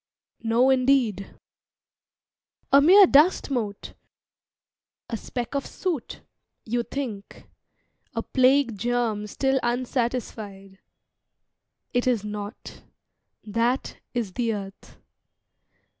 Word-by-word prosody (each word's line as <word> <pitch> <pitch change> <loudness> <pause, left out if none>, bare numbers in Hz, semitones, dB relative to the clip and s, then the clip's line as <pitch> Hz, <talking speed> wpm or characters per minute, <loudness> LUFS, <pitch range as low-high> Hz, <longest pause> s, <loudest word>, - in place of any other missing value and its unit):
"No, 235 +3 +3
indeed." 255 -7 +1 1.4
"A 275 - +7
mere 380 +7 +8
dust 300 0 +4
mote, 215 -6 -3 1.1
a 230 - -3
speck 240 +3 -5
of 280 -1 -2
soot, 340 -9 -4 0.4
you 240 +2 0
think, 235 -6 -7 0.7
A - - -2
plague 260 -2 +3
germ 235 -3 -1
still 265 +5 0
unsatisfied. 235 -5 -3 1.1
It 245 +1 +1
is 235 -5 +1
not. 210 +1 -7 0.6
That 230 +5 -1 0.2
is 225 -6 -2
the 230 -1 -1
Earth. 195 -1 -10
240 Hz, 90 wpm, -25 LUFS, 210-265 Hz, 1.4 s, mere